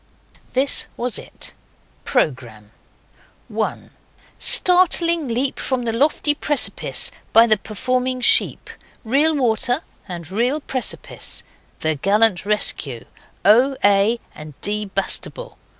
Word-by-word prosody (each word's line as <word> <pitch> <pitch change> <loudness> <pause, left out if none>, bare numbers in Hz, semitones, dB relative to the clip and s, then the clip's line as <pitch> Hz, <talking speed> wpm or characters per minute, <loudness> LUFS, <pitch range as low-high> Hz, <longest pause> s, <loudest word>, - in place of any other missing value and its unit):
This 265 +2 +3
was 245 -1 -2
it: - - -10 0.5
PROGRAMME 120 - -3 0.8
1. - - -4 0.5
Startling 340 -3 +4
leap 250 +3 -2
from 260 -2 -2
the 230 -1 -2
lofty 290 +4 +2
precipice 295 -1 +1 0.2
by 225 +1 +7
the 220 -2 +4
performing 255 +5 -3
sheep. 245 - +3 0.3
Real 290 +7 +2
water, 245 +2 0 0.2
and 175 -2 -8
real 245 +9 -1
precipice. 260 -4 -3 0.4
The 160 0 0
gallant 200 +3 +1
rescue. 145 - -2 0.4
O. 250 +7 +4
A. 205 +3 +3
and 150 -2 -12
D. 210 +1 0
Bastable. 200 - -4
235 Hz, 105 wpm, -19 LUFS, 195-270 Hz, 0.8 s, by